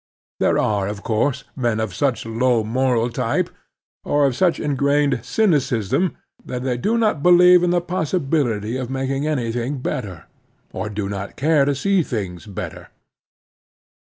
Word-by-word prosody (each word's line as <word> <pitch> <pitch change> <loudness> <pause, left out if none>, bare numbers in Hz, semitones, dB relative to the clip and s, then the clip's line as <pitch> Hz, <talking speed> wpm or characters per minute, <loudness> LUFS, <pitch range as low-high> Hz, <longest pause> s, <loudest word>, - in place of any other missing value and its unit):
There - - +2
are, 100 -2 +1
of 105 0 -6
course, 125 +4 0
men 120 -4 0
of 110 -4 -2
such 130 +4 -1
low 115 0 +1
moral 120 +1 +1
type, - - -1 0.5
or 145 0 +2
of 135 -3 +1
such 180 +4 +2
ingrained 140 -1 +1
cynicism, 155 - +1 0.3
that 125 0 -5
they 130 -2 0
do 210 - 0
not 215 -10 +1
believe 180 +1 +7
in 180 - +2
the 175 0 +2
possibility 140 - -1
of 130 -2 -4
making 135 +2 -2
anything 125 -1 -2
better, 100 -7 -5 0.5
or 110 - -4
do 105 -1 -3
not 100 0 -5
care 150 0 +3
to 140 0 +1
see 195 +6 +2
things 100 - -5
better. 100 -4 -7
130 Hz, 150 wpm, -21 LUFS, 110-150 Hz, 0.5 s, believe